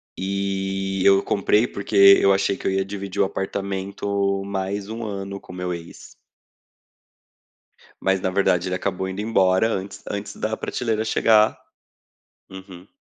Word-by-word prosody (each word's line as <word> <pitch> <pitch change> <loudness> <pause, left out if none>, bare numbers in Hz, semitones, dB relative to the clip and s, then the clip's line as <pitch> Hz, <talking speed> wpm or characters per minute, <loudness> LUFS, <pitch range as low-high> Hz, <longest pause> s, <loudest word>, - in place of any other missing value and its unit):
e 95 0 -2
eu 100 0 +5
comprei, 105 +3 +2
porque 100 -1 -6 0.3
eu 100 - +5
achei 100 0 +1
que - - -5
eu - - +2
ia 95 0 0
dividir 100 -1 -6
o - - +5
apartamento 100 0 -2
mais 100 0 -3
um 115 +1 -6
ano 100 -2 -5
com - - -13
o - - -9
meu 90 0 -3
ex. 85 -1 -10 1.9
Mas 95 -1 +1
na 95 - 0
verdade 90 -2 +1
ele 90 - -1
acabou 90 +1 -2
indo 95 +2 -4
embora 95 -2 +3
antes 100 -2 -5
antes 100 0 -5
da 110 0 -2
prateleira 110 -2 -2
chegar. 110 -1 +3 0.9
Uhum. 95 -1 -11
95 Hz, 150 wpm, -23 LUFS, 95-100 Hz, 1.9 s, eu